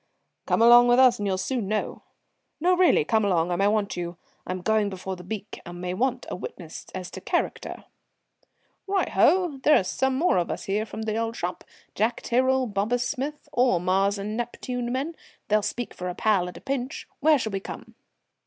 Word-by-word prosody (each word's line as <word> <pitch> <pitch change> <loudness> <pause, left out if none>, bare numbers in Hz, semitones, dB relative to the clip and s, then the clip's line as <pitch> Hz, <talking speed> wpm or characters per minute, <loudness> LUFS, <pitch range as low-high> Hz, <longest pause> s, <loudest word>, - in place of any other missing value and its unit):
"Come 230 - +3
on 240 +1 +8
with 245 0 +5
us 255 -3 +6
and 205 - -1
you'll 190 -1 0
soon 215 +3 -2
know. 215 +1 -2 0.6
No, 360 +3 +3
really, 355 - +4
come 220 +3 +2
along, 180 -3 +1
I - - +1
may 195 +3 +2
want 205 -1 0
you. 175 -1 -5 0.3
I'm 185 -1 -4
going 215 0 +2
before 190 0 -5
the 180 - -11
beak 205 +2 -6
and 175 0 -9
may 180 0 -3
want 255 +5 -1
a - - -2
witness 170 -2 -8
as 185 -1 -6
to - - -8
character." - - -2 1.0
"Right 390 0 0
oh! 350 -7 +3
There 300 +3 +6
are - - -2
some 265 +7 0
more 325 - +3
of 175 - 0
us - - -4
here 210 +3 -1
from 220 - -6
the 220 0 -2
old 230 0 -2
shop 175 -2 -4 0.3
Jack 220 +4 0
Tyrrell, 260 +2 +2
Bobus 225 +3 0
Smith 290 +3 -4
all 245 -8 +3
Mars 195 +3 +1
and 205 +2 -4
Neptune 240 +1 -3
men. 280 +6 -2 0.3
They'll 215 0 +4
speak 230 +3 -4
for 180 0 -5
a 180 - -5
pal 195 -5 +2
at - - -11
a - - -12
pinch. 270 -1 -4
Where 305 +1 +5
shall 220 -4 -3
we 195 - -2
come?" - - -9
220 Hz, 205 wpm, -25 LUFS, 190-255 Hz, 1.0 s, on